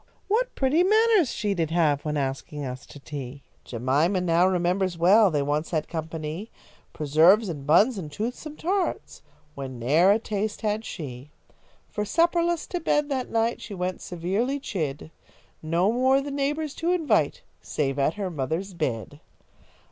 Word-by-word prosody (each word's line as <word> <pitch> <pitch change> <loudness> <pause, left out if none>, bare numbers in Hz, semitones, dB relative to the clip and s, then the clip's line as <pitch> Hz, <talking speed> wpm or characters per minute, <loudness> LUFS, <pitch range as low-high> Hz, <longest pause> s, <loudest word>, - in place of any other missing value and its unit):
What 470 +5 0
pretty 275 +5 +2
manners 425 - +4
she 205 -2 -1
did 165 -4 -1
have 155 -4 +2
When 150 -1 -2
asking 140 +1 -3
us 125 0 -7
to 145 - -12
tea." 140 -1 -8 0.2
Jemima 140 - +1
now 175 0 +3
remembers 180 0 0
well 195 +5 +6
They 145 -4 0
once 150 +3 -1
had 155 -3 -1
company, 160 +4 -5 0.4
Preserves 165 +8 +4
and 145 -4 -6
buns 200 - +4
and 155 -5 -7
toothsome 250 - -5
tarts 375 +2 -2 0.3
When 135 -3 -7
ne'er 150 +10 +3
a 205 - +4
taste 215 -1 -3
had 215 0 -1
she. 135 -3 -7 0.6
For, 210 - -3
supperless, 340 - +1
to 355 - -2
bed 295 -2 +1
that 260 -3 -2
night, 230 +1 0
She 205 - -7
went, 180 0 -3
severely 195 +11 -2
chid; 155 - -4 0.5
No 170 +6 +1
more 260 +3 +3
the 280 +1 -5
neighbours 285 +2 -1
to 335 - -1
invite, 360 +8 +1 0.2
Save 135 -2 -2
at 140 +3 +1
her 195 -3 -3
mother's 160 +6 -3
bid. 145 -3 -3
180 Hz, 155 wpm, -25 LUFS, 150-250 Hz, 0.6 s, well